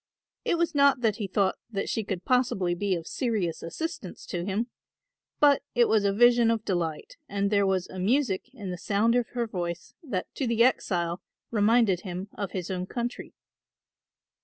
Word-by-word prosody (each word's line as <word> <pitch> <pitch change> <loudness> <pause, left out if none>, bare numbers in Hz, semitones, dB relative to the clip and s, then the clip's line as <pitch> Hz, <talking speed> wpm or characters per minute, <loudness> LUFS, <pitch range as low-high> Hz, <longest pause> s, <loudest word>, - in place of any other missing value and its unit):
It 340 - +1
was 335 0 +1
not 280 -3 +4
that 220 -3 +2
he 210 -4 -3
thought 190 0 +1
that 200 -4 -3
she 225 - -1
could 190 -3 -4
possibly 240 -8 +2
be 190 +2 0
of 165 -2 -5
serious 210 -10 -1
assistance 195 - -5
to 175 -1 -3
him; 200 +5 -1 0.7
but 290 -2 +5
it 240 -1 +5
was 215 -2 +3
a 200 - +3
vision 240 +2 +5
of 225 -1 0
delight 170 -5 -2
and 200 0 0
there 200 -1 +3
was 190 -2 0
a 185 - -8
music 235 +1 +1
in 205 -8 -6
the 180 - -5
sound 215 +5 +2
of 245 -2 +2
her 240 -1 0
voice 175 -5 -5
that 250 - -4
to 270 - -2
the 230 0 +3
exile 175 -8 +1 0.3
reminded 215 -4 +3
him 185 +1 -6
of 200 -2 -4
his 185 -1 -4
own 180 0 -3
country. 240 +2 -5
205 Hz, 185 wpm, -27 LUFS, 185-240 Hz, 0.7 s, but